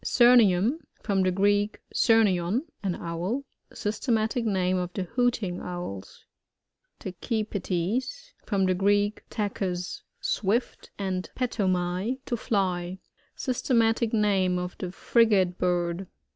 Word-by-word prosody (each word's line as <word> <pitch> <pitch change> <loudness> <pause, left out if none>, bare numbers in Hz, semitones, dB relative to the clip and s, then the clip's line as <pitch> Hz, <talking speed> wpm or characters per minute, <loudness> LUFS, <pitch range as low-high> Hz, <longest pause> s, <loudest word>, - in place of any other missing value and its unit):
Syrnium. 240 - +5
— - - -38
From 200 -3 +1
the 185 - +3
Greek, 205 +3 +1
surnton, 215 - +3 0.2
an 190 -4 -1
owl. 175 +11 -3 0.3
Systematic 220 +2 -1
name 185 -3 +1
of 180 -1 -2
the 195 - -2
Hooting 230 -4 0
Owls. 175 - -7 0.7
TACHYPETEs. 215 - -3
From 195 -2 +1
the 185 - +3
Greek, 205 +3 +2
taehus 185 -4 -3 0.2
swift, 220 +5 -1
and 190 -2 -3
petomai^ 190 -1 0
to 240 - -1
fly. 185 -5 -1 0.4
Syate. 255 0 -1
matic 225 0 +2
name 195 -4 +2
of 180 0 -4
the 180 - -4
Frigate 195 -4 +2
bird. 175 0 0
195 Hz, 115 wpm, -27 LUFS, 180-225 Hz, 0.7 s, Syrnium